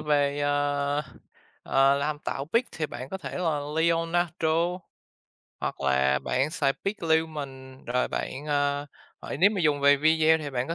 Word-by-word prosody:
về, 145 Hz, -1 st, +1 dB
ờ, 145 Hz, 0 st, 0 dB, 0.6 s
ờ, 135 Hz, +1 st, +4 dB
làm 145 Hz, +1 st, -1 dB
tạo 140 Hz, -2 st, -4 dB
pic 235 Hz, +2 st, +3 dB
thì 155 Hz, -1 st, -2 dB
bạn 130 Hz, -2 st, -8 dB
có 190 Hz, -, -5 dB
thể 160 Hz, 0 st, -6 dB
là 160 Hz, -5 st, 0 dB, 0.2 s
Leonardo, 165 Hz, 0 st, +1 dB, 1.1 s
hoặc -, -, -3 dB
là 65 Hz, 0 st, +2 dB
bạn 135 Hz, +4 st, 0 dB
xài 140 Hz, -3 st, +1 dB
PicLumen, 155 Hz, -8 st, -2 dB
rồi 125 Hz, +1 st, 0 dB
bạn, -, -, -3 dB
ờ, 145 Hz, -1 st, 0 dB, 0.5 s
nếu 200 Hz, +3 st, +6 dB
mà 200 Hz, -4 st, -2 dB
dùng 150 Hz, -3 st, +2 dB
về 140 Hz, 0 st, +6 dB
video 160 Hz, +2 st, +4 dB
thì 150 Hz, -2 st, -5 dB
bạn 125 Hz, -1 st, -2 dB
có 165 Hz, -, -2 dB
145 Hz, 155 wpm, -27 LUFS, 140-160 Hz, 1.1 s, nếu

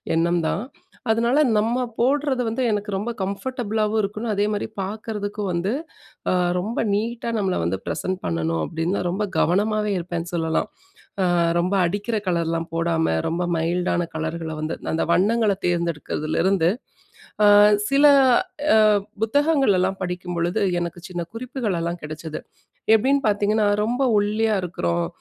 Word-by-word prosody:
எண்ணம் 170 Hz, 0 st, +1 dB
தான். 200 Hz, -, -1 dB, 0.5 s
அதனால, 235 Hz, +5 st, +2 dB, 0.2 s
"நம்ம 235 Hz, +4 st, +1 dB, 0.2 s
போடுறது 275 Hz, +1 st, +1 dB
வந்து 225 Hz, +4 st, -2 dB
எனக்கு 210 Hz, 0 st, -2 dB
ரொம்ப 210 Hz, +5 st, -2 dB
கம்ஃபர்டபுளாவும் 215 Hz, +1 st, -1 dB
இருக்கணும், 215 Hz, +3 st, -3 dB
அதேமாரி 205 Hz, +1 st, 0 dB
பார்க்கறதுக்கு 210 Hz, +1 st, -4 dB
வந்து, 175 Hz, +4 st, -1 dB, 0.6 s
அ -, -, +2 dB, 0.2 s
ரொம்ப 210 Hz, +6 st, -2 dB
நீட்டா 230 Hz, +3 st, -2 dB
நம்மள 195 Hz, -3 st, 0 dB
வந்து 85 Hz, +3 st, -1 dB
ப்ரசன்ட் 185 Hz, 0 st, -2 dB
பண்ணணும்." 80 Hz, -1 st, -1 dB
அப்படின்னு 165 Hz, +4 st, -2 dB
நான் 180 Hz, -, -1 dB
ரொம்ப 200 Hz, +4 st, -1 dB
கவனமாவே 210 Hz, +4 st, +1 dB
இருப்பேன்னு 175 Hz, 0 st, -4 dB
சொல்லலாம். 160 Hz, -1 st, 0 dB, 0.6 s
அ -, -, +3 dB, 0.3 s
ரொம்ப 180 Hz, +3 st, 0 dB
அடிக்கிற 205 Hz, +5 st, -2 dB
கலர்லாம் 165 Hz, -2 st, -1 dB
போடாம, 165 Hz, -, +1 dB
ரொம்ப 170 Hz, +2 st, -1 dB
மைல்டான 175 Hz, +1 st, 0 dB
கலர்கள 160 Hz, +1 st, -3 dB
வந்து 155 Hz, +1 st, -3 dB, 0.2 s
அந்த 160 Hz, -, 0 dB
வண்ணங்கள 215 Hz, +1 st, +3 dB
தேர்ந்தெடுக்கிறதுலேருந்து 170 Hz, +1 st, 0 dB, 0.8 s
அ -, -, +7 dB, 0.4 s
சில 275 Hz, +1 st, +4 dB, 0.7 s
அ -, -, +6 dB, 0.4 s
புத்தகங்களல்லாம் 225 Hz, -, +2 dB
படிக்கும்பொழுது, 180 Hz, +1 st, -2 dB, 0.2 s
எனக்கு 170 Hz, 0 st, -4 dB
சின்ன 175 Hz, -1 st, -3 dB
குறிப்புகளெல்லாம் 205 Hz, -9 st, -3 dB
கிடைச்சது. 155 Hz, +1 st, -6 dB, 0.5 s
எப்படின்னு 270 Hz, +6 st, +3 dB
பார்த்தீங்கன்னா, 205 Hz, +1 st, +2 dB, 0.2 s
ரொம்ப 245 Hz, +4 st, -1 dB, 0.2 s
ஒல்லியா 215 Hz, +1 st, +1 dB
இருக்கிறோம், 170 Hz, -1 st, -1 dB
195 Hz, 125 wpm, -23 LUFS, 170-220 Hz, 0.8 s, அ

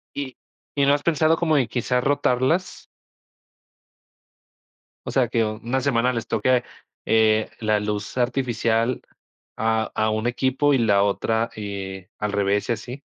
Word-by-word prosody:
¿Y 135 Hz, -3 st, -5 dB, 0.4 s
y 140 Hz, -, +4 dB
no 140 Hz, -, +5 dB
has 145 Hz, -, 0 dB
pensado 160 Hz, 0 st, +3 dB
como 160 Hz, -3 st, +2 dB
en 125 Hz, -3 st, +2 dB
quizás 125 Hz, +1 st, -1 dB
rotarlas? 140 Hz, +5 st, 0 dB, 2.2 s
O -, -, -2 dB
sea, -, -, +2 dB
que 115 Hz, -, +1 dB
una 115 Hz, +5 st, -2 dB
semana 125 Hz, -2 st, +2 dB
les 115 Hz, 0 st, -4 dB
toque, 125 Hz, -1 st, +2 dB, 0.4 s
eh, 110 Hz, -1 st, +3 dB
la 110 Hz, -1 st, +1 dB
luz 105 Hz, +3 st, -4 dB
artificial 120 Hz, -1 st, 0 dB, 0.6 s
a 110 Hz, 0 st, 0 dB
a 110 Hz, 0 st, +1 dB
un 110 Hz, +2 st, -1 dB
equipo, 130 Hz, +3 st, +1 dB
y -, -, +4 dB
la 100 Hz, -4 st, +3 dB
otra, 110 Hz, +3 st, 0 dB
eh, 95 Hz, -2 st, -6 dB
al 105 Hz, -1 st, -1 dB
revés, 100 Hz, +2 st, 0 dB
y -, -, +3 dB
así. 120 Hz, +5 st, -7 dB
115 Hz, 145 wpm, -23 LUFS, 110-130 Hz, 2.2 s, no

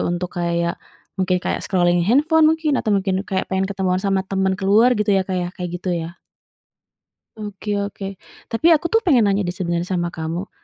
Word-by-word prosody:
untuk 175 Hz, +1 st, -3 dB
kayak, 170 Hz, 0 st, -1 dB, 0.4 s
mungkin 185 Hz, 0 st, +2 dB
kayak -, -, -1 dB
scrolling 175 Hz, -2 st, +2 dB
handphone 310 Hz, +5 st, +4 dB
mungkin 320 Hz, -1 st, +1 dB
atau -, -, -5 dB
mungkin 190 Hz, -1 st, 0 dB
kayak 190 Hz, -2 st, -1 dB
pengen 190 Hz, 0 st, 0 dB
ketemuan 185 Hz, -2 st, -1 dB
sama 195 Hz, -1 st, 0 dB
temen 190 Hz, 0 st, 0 dB
keluar 215 Hz, +5 st, +4 dB
gitu 210 Hz, -1 st, +1 dB
ya 195 Hz, -, +3 dB
Kak 185 Hz, 0 st, -3 dB
ya, 175 Hz, -1 st, -1 dB
kayak 180 Hz, -2 st, -5 dB
gitu 180 Hz, +1 st, -3 dB
ya. 170 Hz, 0 st, -4 dB, 1.2 s
Oke 205 Hz, 0 st, -4 dB
oke 200 Hz, -1 st, -5 dB, 0.3 s
tapi 230 Hz, +8 st, 0 dB
aku 325 Hz, +3 st, -1 dB
tuh 450 Hz, -, +4 dB
pengen 260 Hz, -8 st, +5 dB
nanya 195 Hz, -1 st, 0 dB
deh 175 Hz, -, -3 dB
sebenarnya 175 Hz, -1 st, -2 dB
sama 175 Hz, -1 st, -1 dB
kamu, 165 Hz, +3 st, -5 dB
190 Hz, 185 wpm, -21 LUFS, 175-210 Hz, 1.2 s, pengen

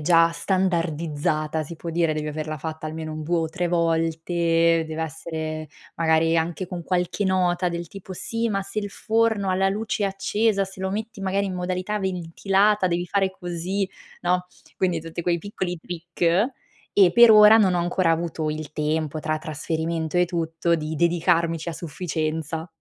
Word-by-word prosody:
già 165 Hz, +1 st, +5 dB
standardizzata, 165 Hz, -4 st, -1 dB
si 165 Hz, +3 st, -8 dB
può 165 Hz, +1 st, -6 dB
dire, 165 Hz, -2 st, +1 dB
devi 150 Hz, 0 st, -3 dB
averla 155 Hz, +1 st, -4 dB
fatta 160 Hz, +1 st, -5 dB
almeno 155 Hz, 0 st, -5 dB
un 155 Hz, 0 st, -5 dB
2 170 Hz, +3 st, 0 dB
o 160 Hz, -, -1 dB
3 175 Hz, +1 st, -1 dB
volte, 165 Hz, 0 st, +2 dB
deve 160 Hz, 0 st, -3 dB
essere 155 Hz, 0 st, -5 dB, 0.3 s
magari 165 Hz, 0 st, +3 dB
anche 170 Hz, +3 st, -2 dB
con 175 Hz, -2 st, -6 dB
qualche 180 Hz, +3 st, -1 dB
nota 180 Hz, -1 st, +2 dB
del 170 Hz, -1 st, -5 dB
tipo: 190 Hz, 0 st, -9 dB
"Sì, 230 Hz, +5 st, -2 dB
ma 195 Hz, -2 st, -1 dB
se 200 Hz, +2 st, -5 dB
il 205 Hz, -, -2 dB
forno 220 Hz, -2 st, +1 dB
ha -, -, +2 dB
la 190 Hz, +1 st, +2 dB
luce 210 Hz, +1 st, -1 dB
accesa, 200 Hz, +1 st, +1 dB
se 190 Hz, 0 st, -11 dB
lo 190 Hz, -, -1 dB
metti 215 Hz, +2 st, -4 dB
magari 195 Hz, +1 st, 0 dB
in 195 Hz, -, -3 dB
modalità 185 Hz, +3 st, -2 dB
ventilata, 190 Hz, +2 st, +1 dB
devi 175 Hz, 0 st, 0 dB
fare 195 Hz, +1 st, +1 dB
così", 185 Hz, +2 st, -3 dB, 0.4 s
no, 180 Hz, +1 st, +1 dB, 0.3 s
quindi 180 Hz, -3 st, +1 dB
tutti 165 Hz, +1 st, -5 dB
quei 170 Hz, 0 st, +1 dB
piccoli 180 Hz, -1 st, -4 dB
trick, 175 Hz, +1 st, -8 dB, 0.7 s
e 190 Hz, -4 st, +6 dB
per 235 Hz, +1 st, +8 dB
ora 215 Hz, +1 st, +9 dB
non 190 Hz, -4 st, +4 dB
ho -, -, +1 dB
ancora 175 Hz, 0 st, +2 dB
avuto 165 Hz, -1 st, -2 dB
il 155 Hz, 0 st, -4 dB
tempo 155 Hz, 0 st, -1 dB
tra 155 Hz, 0 st, -1 dB
trasferimento 160 Hz, +1 st, -3 dB
e 180 Hz, -, +5 dB
tutto 170 Hz, -1 st, -1 dB
di 155 Hz, -1 st, -3 dB
dedicarmici 170 Hz, 0 st, +1 dB
a -, -, -2 dB
sufficienza. 160 Hz, -1 st, -3 dB
170 Hz, 170 wpm, -24 LUFS, 160-190 Hz, 0.7 s, ora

